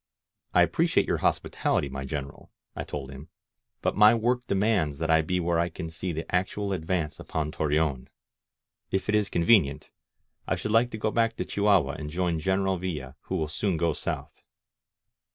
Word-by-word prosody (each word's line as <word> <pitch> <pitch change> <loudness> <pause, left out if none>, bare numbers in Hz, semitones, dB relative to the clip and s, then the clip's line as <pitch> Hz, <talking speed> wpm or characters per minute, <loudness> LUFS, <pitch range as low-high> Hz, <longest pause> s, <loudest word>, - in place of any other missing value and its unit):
"I - - +7
appreciate - - +2
your - - 0
hospitality, 70 - 0
my 70 0 -5
General," 70 0 -6 0.3
I - - -3
told 70 -2 -6
him, 70 +4 -11 0.5
^^but - - +1
my 105 +3 +7
work 120 +2 0
demands 95 -8 +1
that 80 +1 0
I 80 0 +5
be 90 +3 -1
where 85 -1 +1
I 85 +1 +1
can 80 0 -7
see 90 +2 -4
the 80 +1 -4
actual 95 +2 0
advance 85 -3 -2
upon 75 -1 -3
Torreon. 75 -4 0 0.8
If 95 +2 -2
it - - +2
is 105 -2 +2
convenient, 85 -5 +3 0.6
I - - +1
should 105 - -4
like 115 +2 +4
to 110 - -6
go 110 0 -1
back 115 0 +1
to - - -3
Chihuahua 100 -9 +2
and 75 -1 -5
join 85 0 -1
General 95 +2 0
Villa, 75 -8 -5
who 95 - -3
will 80 -4 0
soon 90 +3 -1
go 85 0 +1
south." - - -5
85 Hz, 180 wpm, -27 LUFS, 75-100 Hz, 0.8 s, I